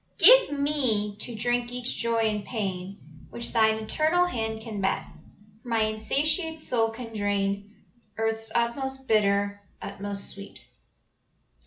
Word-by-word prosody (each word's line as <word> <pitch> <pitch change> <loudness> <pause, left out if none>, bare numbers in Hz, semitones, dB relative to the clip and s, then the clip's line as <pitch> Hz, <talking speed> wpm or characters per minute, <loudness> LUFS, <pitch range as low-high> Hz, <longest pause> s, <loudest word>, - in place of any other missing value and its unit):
"Give - - +8
me 250 -8 +1
to 240 - -6
drink 240 +2 0
each 250 0 -1
joy 230 -1 +1
and 210 -2 0
pain 195 -3 -4 0.3
Which 235 - -6
Thine 220 -2 +4
eternal 315 +10 +2
hand 225 -8 -3
can 215 -3 -5
mete, 195 - 0 0.6
For - - -16
my 225 -1 +2
insatiate 300 - 0
soul 235 -7 +1
can 230 0 -8
drain 205 0 -1 0.4
Earth's 225 0 0
utmost 265 +3 -1
bitter, 200 -1 +2 0.2
utmost 200 0 -5
sweet. 200 0 -11
225 Hz, 130 wpm, -27 LUFS, 205-250 Hz, 0.6 s, Give